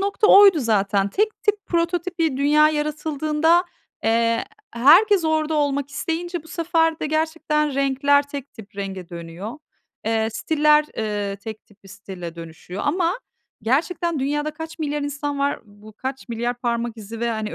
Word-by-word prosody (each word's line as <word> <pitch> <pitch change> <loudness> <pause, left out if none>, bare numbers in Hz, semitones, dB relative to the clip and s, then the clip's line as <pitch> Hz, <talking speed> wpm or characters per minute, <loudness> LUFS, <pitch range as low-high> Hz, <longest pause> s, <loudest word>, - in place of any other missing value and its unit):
nokta 400 +2 +1
oydu 395 -6 +8
zaten. 200 -4 +1
Tek 430 - -1
tip 415 -1 0
prototip 345 +1 -1
bir 320 -5 +1
dünya 300 +2 +4
yaratıldığında, 305 +2 +1 0.4
eee, 230 +1 +2 0.3
herkes 340 - +5
orada 315 0 +1
olmak 285 -2 0
isteyince 330 +4 -3
bu 320 - -17
sefer 325 -1 0
de - - -1
gerçekten 310 -1 0
renkler 275 +1 +3
tek 280 -1 -7
tip 210 -3 -14
renge 190 -3 -5
dönüyor. 170 +5 -7 0.5
Eee, 220 0 +1
stiller, 300 +3 +3
eee, 205 -2 -2
tek 215 +1 -9
tip 205 -1 -25
bir - - -14
stile 190 -4 -8
dönüşüyor 170 +3 -8
ama 360 +3 +1 0.4
gerçekten 330 +6 0
dünyada 295 +3 -1
kaç 320 +2 -9
milyar 295 -2 -2
insan 285 0 -3
var, 280 0 0
bu 210 0 -16
kaç 265 +5 -6
milyar 240 +1 -2
parmak 235 -1 -2
izi 220 +1 -8
ve, 235 0 0
hani, 220 -1 -3
285 Hz, 155 wpm, -22 LUFS, 220-320 Hz, 0.5 s, oydu